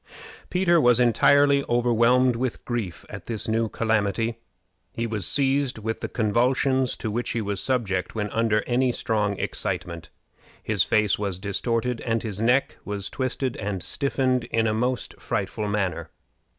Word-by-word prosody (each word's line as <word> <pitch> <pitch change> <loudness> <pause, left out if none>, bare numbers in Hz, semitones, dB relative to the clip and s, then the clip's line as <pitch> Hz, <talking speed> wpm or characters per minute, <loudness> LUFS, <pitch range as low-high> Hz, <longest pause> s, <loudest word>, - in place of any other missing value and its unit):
Peter 175 -2 +3
was 120 -2 +4
entirely 140 +4 +4
overwhelmed 120 +1 +3
with 125 0 -3
grief 115 -8 -4
at - - -9
this 110 -3 -2
new 110 0 0
calamity. 110 +1 0 0.5
He 115 - -2
was 110 -5 0
seized 140 -2 +1
with 110 +1 -3
the - - -4
convulsions 125 +4 +1
to 110 - -4
which 120 +3 -2
he 115 - -1
was 100 -2 -2
subject 100 -9 -1
when 105 -2 -1
under 110 -2 +1
any 125 +1 +2
strong 105 -4 -1
excitement, 90 -4 -4 0.5
his 110 -3 0
face 105 -2 +2
was 100 -3 -2
distorted, 115 +5 -1
and 115 -1 -1
his 105 -2 -3
neck 125 +4 +2
was 100 -1 -4
twisted 130 -1 -2
and 95 -3 -4
stiffened 130 -3 0
in 115 0 0
a 110 - +1
most 125 +2 -2
frightful 105 - -2
manner. 90 -6 -2
115 Hz, 150 wpm, -25 LUFS, 105-125 Hz, 0.5 s, was